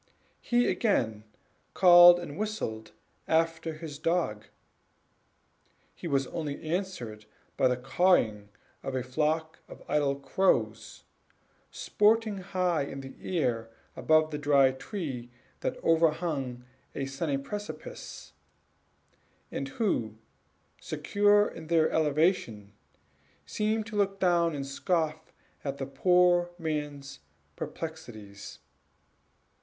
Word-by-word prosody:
He 240 0 +2
again 110 - 0 0.5
called 175 -1 +9
and 160 -5 -7
whistled 155 - -4 0.4
after 165 0 +1
his 155 -2 -8
dog; 165 -11 -1 1.5
he - - -7
was 140 -3 +1
only 145 0 -5
answered 155 - -4 0.3
by 130 - +3
the 125 0 0
cawing 125 - +2 0.3
of 135 - -4
a 130 - -1
flock 155 +5 -1
of - - -12
idle 145 -2 +1
crows, 135 - 0 0.7
sporting 215 -1 +1
high 180 -3 0
in 135 -1 -6
air 125 -10 -1 0.3
about 155 0 +2
a 150 - -3
dry 140 -2 +4
tree 130 - -6 0.3
that - - -3
overhung 155 -6 +1 0.3
a 135 - -2
sunny 135 +1 -2
precipice; 205 - -8 1.2
and - - -3
who, 205 - -1 0.6
secure 205 0 +2
in 160 -1 -9
their 165 -1 +3
elevation, 150 - 0 0.7
seemed 215 +1 -1
to 225 -1 -8
look 195 -1 0
down 170 -3 +2
and 140 -1 -4
scoff 160 +2 -2 0.3
at 140 -1 -3
the 135 - -3
poor 175 +5 +3
man's 150 -4 -4 0.4
perplexities. 110 -12 -8
155 Hz, 105 wpm, -29 LUFS, 135-180 Hz, 1.5 s, called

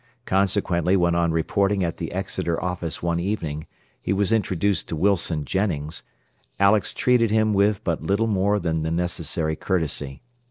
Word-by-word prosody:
Consequently 95 -2 +1
when 85 -1 +2
on 85 -1 +2
reporting 100 +4 +1
at 85 -1 -2
the 80 - -5
Exeter 95 -3 -2
office 90 -2 -3
one 85 0 0
evening 85 -5 -3 0.3
he - - -2
was 100 +1 +1
introduced 100 -3 0
to - - -2
Wilson 85 -4 +1
Jennings, 85 -4 -2 0.6
Alex 100 -1 +4
treated 125 -3 +3
him 110 0 +2
with 100 0 +2
but 85 -3 -1
little 100 +7 +1
more 100 -1 +1
than 80 -3 -1
necessary 80 -1 -1
courtesy. 80 - -1
90 Hz, 150 wpm, -23 LUFS, 80-100 Hz, 0.6 s, Alex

